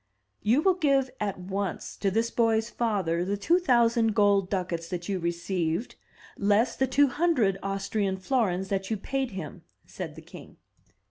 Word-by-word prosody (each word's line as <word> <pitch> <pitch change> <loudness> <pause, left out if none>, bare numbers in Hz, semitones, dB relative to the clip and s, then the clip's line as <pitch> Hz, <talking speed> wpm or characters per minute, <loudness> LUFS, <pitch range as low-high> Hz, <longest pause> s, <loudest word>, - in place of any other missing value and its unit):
"You 245 +8 +2
will 380 - +5
give 275 -7 +1
at 200 -3 -2
once 190 0 -4
to 200 - 0
this 225 +4 0
boy's 225 -1 +1
father 190 -8 0
the 200 +3 -2
two 335 - +3
thousand 235 - +3
gold 200 -3 +3
ducats 180 -4 -2
that 175 -2 -4
you 195 -2 -1
received, 170 +3 -2 0.5
less 205 +4 +2
the 265 - +1
two 275 +2 +4
hundred 255 - +1
Austrian 195 0 -1
florins 190 -4 0
that 195 -1 -2
you 220 - -1
paid 265 +5 -2
him," 190 -3 -7 0.2
said - - -7
the - - -11
king. - - -13
205 Hz, 160 wpm, -27 LUFS, 190-240 Hz, 0.5 s, will